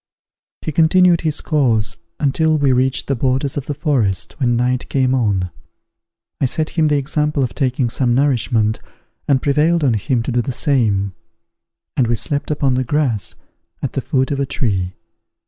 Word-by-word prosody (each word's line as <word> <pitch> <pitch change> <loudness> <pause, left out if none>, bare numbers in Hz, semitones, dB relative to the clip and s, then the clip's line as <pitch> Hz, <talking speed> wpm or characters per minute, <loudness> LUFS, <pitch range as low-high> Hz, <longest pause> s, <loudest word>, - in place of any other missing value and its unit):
He - - -2
continued 170 +3 +4
his 155 -2 -1
course 120 - +1 0.2
until 155 +2 +2
we 140 -3 +2
reached 130 +1 +1
the 140 - -1
borders 130 +2 0
of 140 -2 -4
the 145 - -3
forest, 125 - 0
when 120 -3 +2
night 125 +1 0
came 130 -2 +1
on. 100 -8 0 0.9
I - - +2
set 155 +5 -2
him 160 -2 +2
the 150 -1 +2
example 150 +1 0
of 125 - -3
taking 130 -1 0
some 120 0 0
nourishment, 120 -5 +1 0.5
and 135 -2 +2
prevailed 155 +3 +2
on 130 -4 +3
him 115 +3 0
to 130 - -3
do 120 0 +1
the 125 - -3
same; 110 -8 0 0.8
and 125 - +2
we 120 - +1
slept 145 +4 -1
upon 145 -3 +1
the 130 +1 +1
grass, 130 -5 0 0.5
at - - -2
the - - -1
foot 130 0 0
of 140 - -1
a 140 - +1
tree. 95 -9 -1
130 Hz, 175 wpm, -18 LUFS, 120-145 Hz, 0.9 s, continued